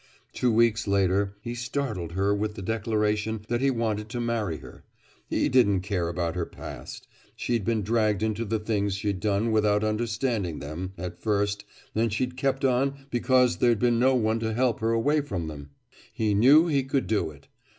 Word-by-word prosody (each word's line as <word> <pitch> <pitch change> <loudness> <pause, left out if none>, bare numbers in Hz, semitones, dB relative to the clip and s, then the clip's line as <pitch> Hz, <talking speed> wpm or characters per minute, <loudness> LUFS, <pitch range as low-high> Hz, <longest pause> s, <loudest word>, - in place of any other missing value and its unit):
Two 125 - +1
weeks 115 -1 +2
later 100 0 +1
he 120 +2 -5
startled 120 - -3
her 100 +2 +1
with 105 +1 -2
the 100 - -7
declaration 105 0 -1
that 120 +1 0
he 135 - +3
wanted 110 -4 -1
to 120 - -4
marry 115 -8 -1
her. - - -13 0.5
He - - +1
didn't 100 -7 +3
care 90 -3 -1
about 85 -1 -2
her 90 -2 -2
past. - - -9 0.3
She'd 120 -3 -1
been 110 0 0
dragged 110 -1 +1
into 110 +1 -1
the 110 0 -1
things 105 -2 -1
she'd 100 -1 -2
done 105 +2 0
without 105 -1 +2
understanding 110 - -1
them, 85 +6 -6
at 90 0 -6
first, 105 -1 0 0.3
and 115 0 +1
she'd 125 +4 -2
kept 135 +1 0
on 135 +2 0
because 125 0 +3
there'd 120 -2 +3
been 120 +1 +2
no 130 +2 +4
one 110 -2 +1
to 110 -1 -2
help 125 -1 +1
her 110 - 0
away 140 +7 +2
from 95 - -4
them. 70 -2 -8 0.4
He 110 -2 0
knew 135 +10 +6
he 145 -5 +2
could 135 -3 -1
do 105 -3 0
it. 70 -2 -15
110 Hz, 185 wpm, -26 LUFS, 100-120 Hz, 0.5 s, knew